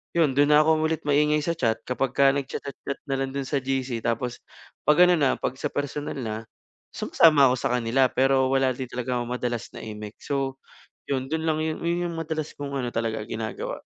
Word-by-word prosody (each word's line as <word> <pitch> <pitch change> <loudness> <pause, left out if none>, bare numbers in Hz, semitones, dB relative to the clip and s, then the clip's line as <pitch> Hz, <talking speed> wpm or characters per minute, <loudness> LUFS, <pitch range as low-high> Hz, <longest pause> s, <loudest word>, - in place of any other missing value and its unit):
yun 165 -4 +4
do'n 145 +1 +4
na 150 - +7
ako 160 0 +3
ulit 160 -1 -2
maingay 150 +1 +3
sa 170 - 0
chat 115 -7 0
kapagka 135 +2 +3
nag-cha-chat-chat 140 0 -5
na 135 - 0
lang 135 0 -2
do'n 140 - -1
sa 140 - 0
GC. 130 -2 -2
Tapos 120 +1 -2 0.5
'pag 150 +4 +7
ano 180 - +5
na 140 -3 +3
'pag - - -2
sa - - -1
personal 145 +1 -3
na, 110 -4 -3 0.6
sumasama 150 -4 +5
ako - - +2
sa - - -1
kanila 125 +2 +3
pero 130 0 +3
wala 135 -1 +3
din 130 0 -5
talaga 125 0 -2
ako 120 - -3
madalas 120 -2 -3
na - - -8
imik. 105 -1 -7
So, 135 -2 -1 0.6
yun 130 -1 0
do'n 160 0 -1
lang 155 -1 +1
yun 155 0 -2
yun 175 +1 0
'yung 165 - -6
madalas 155 -1 -3
kong 140 -1 -5
ano 120 - -2
talaga 115 -1 -1
ginagawa. 110 0 -5
135 Hz, 200 wpm, -25 LUFS, 125-150 Hz, 0.6 s, na